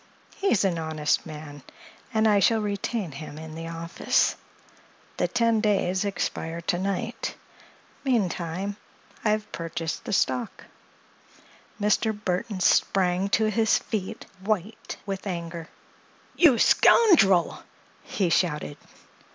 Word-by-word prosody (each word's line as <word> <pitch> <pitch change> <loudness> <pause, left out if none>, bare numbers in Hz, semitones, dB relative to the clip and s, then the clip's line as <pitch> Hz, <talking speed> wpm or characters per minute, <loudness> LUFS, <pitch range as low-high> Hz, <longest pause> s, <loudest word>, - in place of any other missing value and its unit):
He's 240 - +2
an 175 -3 0
honest 155 -2 -1
man, 150 -2 -9 0.5
and 220 -2 +3
I 205 -2 +4
shall 225 +4 +3
retain 205 -2 -2
him 145 +2 -8
in 160 0 -8
the 165 +1 -6
office. 165 0 0 0.8
The - - +1
ten 230 -2 +2
days 195 -2 +1
expire 170 -4 -3
to 175 +1 -1
night. 200 +5 -3 0.7
Meantime, 195 -5 -1 0.5
I've 215 -1 0
purchased 165 -1 -4
the - - -4
stock." 230 +4 0 1.2
Mr. 210 +1 +1
Burthon 185 0 -2
sprang 185 +1 +2
to 215 +2 +2
his 220 +1 +3
feet, 205 -4 -5 0.2
white 210 0 -3
with 195 0 -4
anger. 170 -2 -5 0.7
"You 305 -9 +6
scoundrel!" 220 - +5 0.4
he 200 -10 -1
shouted. 150 -4 0
195 Hz, 110 wpm, -26 LUFS, 165-215 Hz, 1.2 s, You